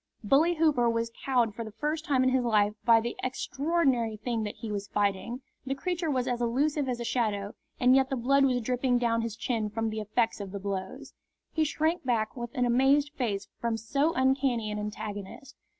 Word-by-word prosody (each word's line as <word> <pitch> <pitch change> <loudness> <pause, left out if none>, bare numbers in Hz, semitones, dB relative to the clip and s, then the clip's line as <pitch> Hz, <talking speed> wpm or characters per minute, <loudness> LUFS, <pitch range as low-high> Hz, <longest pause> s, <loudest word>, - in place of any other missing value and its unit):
Bully 300 +10 +4
Hooper 300 -7 +3
was 230 0 -1
cowed 245 -5 +2
for 230 - -5
the 220 - -7
first 300 +7 -2
time 265 -5 +2
in 260 - +4
his 260 -1 +2
life 210 -3 +3
by 230 -1 +7
the 235 +1 -3
extraordinary 265 -3 0
thing 230 +1 -2
that 210 - -5
he 225 - -6
was 205 -1 -3
fighting. 205 +5 -1 0.2
The 270 0 -2
creature 345 +2 -2
was 260 -3 0
as 245 -1 -1
elusive 275 +4 +1
as 245 -1 -2
a - - -3
shadow, 210 -4 -1 0.3
and 250 +1 +5
yet 265 -1 +3
the 270 - -1
blood 275 +3 +3
was 250 -2 +2
dripping 250 +1 +1
down 230 -1 +1
his 230 -2 -4
chin 225 -2 -2
from 225 +1 -2
the 215 0 -3
effects 225 +2 0
of 200 -1 -7
the 200 - -4
blows. 195 -1 -5 0.4
He 320 - +1
shrank 315 +3 0
back 230 -4 0
with 240 -1 -5
an 250 -2 +2
amazed 270 +4 +3
face 220 -9 -2
from 230 -1 -1
so 275 +8 +1
uncanny 260 -4 +1
an 210 - -3
antagonist. 210 +5 -6
240 Hz, 205 wpm, -28 LUFS, 220-270 Hz, 0.4 s, by